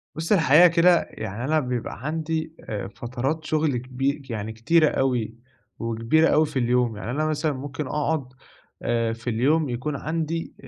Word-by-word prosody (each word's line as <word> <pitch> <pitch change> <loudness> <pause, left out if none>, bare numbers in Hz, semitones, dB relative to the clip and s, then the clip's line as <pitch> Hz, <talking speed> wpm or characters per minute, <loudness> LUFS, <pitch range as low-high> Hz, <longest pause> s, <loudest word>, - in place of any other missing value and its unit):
بص 160 +4 -4
الحقيقة 165 -3 +7
كده، 170 +1 +4
يعني 110 +2 -6
أنا 155 +2 +2
بيبقى 125 0 -4
عندي 160 0 -2
آآ 105 -3 -3
فترات 125 +9 -4
شغل 155 -4 +1
كبي 135 +4 -2
يعني 110 -1 -4
كتيرة 155 +8 +3
أوي 125 -4 0 0.4
وكبيرة 115 +8 +2
أوي 155 +1 +4
في 140 - -3
اليوم، 120 -2 +1
يعني 110 - -5
أنا 155 +4 0
مثلًا 155 0 0
ممكن 145 +2 -5
أقعد 150 +1 -1 0.6
آآ 115 -1 0
في 115 +2 -5
اليوم 140 +6 +2
يكون 125 +5 -3
عندي، 165 +3 -3
140 Hz, 155 wpm, -24 LUFS, 120-155 Hz, 0.6 s, الحقيقة